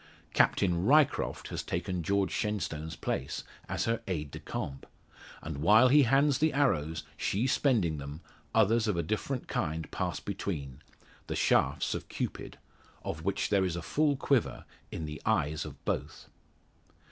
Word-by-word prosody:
Captain 90 -2 +3
Ryecroft 145 +5 +3
has - - -3
taken 90 +1 -2
George 100 +3 +1
Shenstone's 80 -7 -2
place, - - -3 0.3
as - - -1
her 115 0 0
aide 75 -6 -3
de - - -7
camp; 65 -1 -5 0.6
and 75 -3 -5
while 110 - +6
he 145 +3 +7
hands 135 +2 +3
the 155 0 +2
arrows, 85 - +1
she 105 +6 0
spending 110 - +2
them, 70 +3 -7 0.3
others 110 +1 +3
of 105 -5 +1
a 85 - +1
different 120 +5 -2
kind 80 -1 -2
pass - - -2
between 70 -9 -5 0.5
the - - -3
shafts - - +2
of - - -5
Cupid - - -4 0.5
of 80 - -4
which 100 +2 0
there 100 -2 +3
is 90 -3 -1
a 85 - -4
full 150 -1 +2
quiver 135 -3 0 0.3
in 80 - -4
the 75 0 -7
eyes 75 +1 +1
of - - -11
both. - - -3
95 Hz, 155 wpm, -30 LUFS, 80-120 Hz, 0.6 s, he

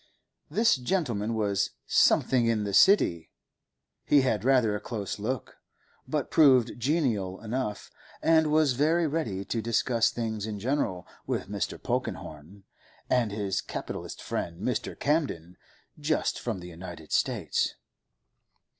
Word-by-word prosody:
This 215 - +3
gentleman 120 - -1
was 100 -2 0 0.2
'something 125 -3 +3
in 110 -2 +1
the 100 -1 -3
City;' 90 - +4 0.7
he 145 - +4
had 125 -5 0
rather 125 -5 +3
a - - -3
close 105 -3 -5
look, 125 +4 -4 0.5
but - - -2
proved 130 -6 +5
genial 115 - 0
enough, 110 -1 -4 0.3
and 160 -1 +4
was 155 -3 +4
very 160 +6 +2
ready 120 -12 -2
to 115 +4 -2
discuss 115 +1 +2
things 110 -3 -3
in 105 -1 -4
general 105 -6 -1 0.2
with - - -2
Mr. - - -3
Polkenhorne 80 +7 -5 0.5
and 120 -4 +2
his 100 -2 -2
capitalist - - -6
friend 85 0 -4
Mr. 125 +3 -3
Camden, 135 - -1 0.4
just 150 +1 0
from 110 -7 -4
the 90 - -9
United 85 -2 -10
States. - - 0
115 Hz, 130 wpm, -28 LUFS, 100-140 Hz, 0.7 s, proved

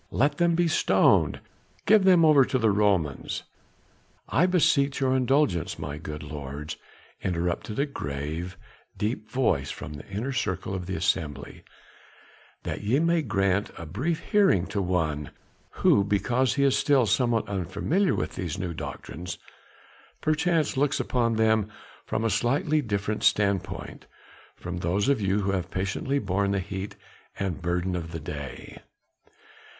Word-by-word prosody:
"Let 145 +3 +1
them 170 -1 +3
be 175 0 +2
stoned!" 160 - +3 0.4
"Give 215 -3 +5
them 180 -3 +6
over 150 -3 +7
to 130 - 0
the 110 -3 +3
Romans!" 95 -9 0 0.8
"I 180 - +3
beseech 145 -7 +2
your 130 -1 +2
indulgence, 130 - +1
my 70 +2 -5
good 75 -1 -6
lords!" 75 0 -6 0.5
interrupted 90 +3 -2
a 140 - +2
grave 80 - -5 0.4
deep 110 0 -2
voice 100 - +1
from 75 - -7
the 70 - -10
inner 110 +8 -3
circle 95 -7 -2
of 90 -2 -4
the 95 - -3
assembly, 75 -6 -2 1.0
"that - - -4
ye 110 +6 +2
may 170 0 +2
grant 100 -5 +1
a 85 - -7
brief 130 - -2
hearing 195 - +4
to 100 - 0
one, 80 -6 -1 0.6
who 100 - +6
because 120 +6 +1
he 140 - +2
is 135 -2 +4
still 140 -4 +3
somewhat 115 +1 +1
unfamiliar 100 - 0
with - - -3
these 85 -4 -4
new 90 -2 -3
doctrines, 85 +3 -6 0.8
perchance 155 0 +1
looks 145 +1 +1
upon 115 -2 +1
them 110 -1 +2 0.4
from 110 - -1
a 115 - +2
slightly 140 - +1
different 105 -3 -2
standpoint 100 -3 0 0.5
from 90 0 -6
those 90 +5 0
of 140 -6 +2
you 100 +1 +1
who 100 0 0
have 90 -2 -2
patiently 95 +10 -1
borne 100 -4 0
the 100 0 +1
heat 95 +2 -5 0.4
and 95 -4 -3
burden 90 +1 -1
of 85 -2 -5
the 80 - -5
day." 70 -1 -7
100 Hz, 145 wpm, -26 LUFS, 90-135 Hz, 1.0 s, over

